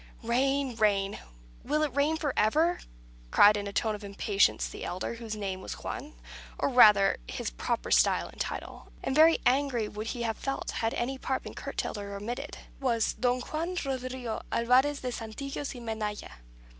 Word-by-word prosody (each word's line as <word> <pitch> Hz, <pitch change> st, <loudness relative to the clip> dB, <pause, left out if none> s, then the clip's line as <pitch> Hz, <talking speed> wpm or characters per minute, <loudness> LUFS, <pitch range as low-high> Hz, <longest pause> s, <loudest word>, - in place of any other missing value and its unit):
"Rain 265 Hz, +2 st, +1 dB
rain! 200 Hz, -2 st, +2 dB, 0.4 s
Will 300 Hz, +3 st, +1 dB
it 295 Hz, -5 st, -1 dB
rain 295 Hz, +3 st, +2 dB
for 290 Hz, -4 st, -1 dB
ever?" 315 Hz, +12 st, +3 dB, 0.5 s
cried, 205 Hz, -, +7 dB
in 205 Hz, -1 st, -3 dB
a -, -, -4 dB
tone 220 Hz, +2 st, 0 dB
of 210 Hz, 0 st, -7 dB
impatience, 200 Hz, 0 st, +1 dB
the -, -, -8 dB
elder, 180 Hz, +5 st, -3 dB
whose 230 Hz, -2 st, -6 dB
name 195 Hz, -3 st, -4 dB
was -, -, -5 dB
Juan; 295 Hz, +2 st, -6 dB, 0.4 s
or -, -, +1 dB
rather, 210 Hz, -6 st, +6 dB
his -, -, -4 dB
proper -, -, -3 dB
style -, -, +4 dB
and -, -, -8 dB
title -, -, -5 dB, 0.2 s
(and -, -, -1 dB
very 320 Hz, +2 st, +7 dB
angry 255 Hz, -4 st, +2 dB
would 210 Hz, +1 st, -6 dB
he 240 Hz, +1 st, -3 dB
have 225 Hz, -2 st, -1 dB
felt 275 Hz, 0 st, -3 dB
had 225 Hz, 0 st, -1 dB
any 260 Hz, +2 st, -2 dB
part 265 Hz, 0 st, -2 dB
been -, -, -8 dB
curtailed 210 Hz, -, -4 dB
or 200 Hz, 0 st, -6 dB
omitted) 240 Hz, +8 st, -5 dB, 0.2 s
was 235 Hz, -5 st, +1 dB
Don 250 Hz, 0 st, 0 dB
Juan 330 Hz, +7 st, -3 dB
Rodrigo 255 Hz, -3 st, -3 dB
Alvarez 260 Hz, +5 st, +3 dB
de 250 Hz, -, -3 dB
Santillanos 275 Hz, +5 st, -5 dB
y -, -, -7 dB
Menaya. 220 Hz, -3 st, -4 dB
240 Hz, 175 wpm, -29 LUFS, 210-275 Hz, 0.5 s, cried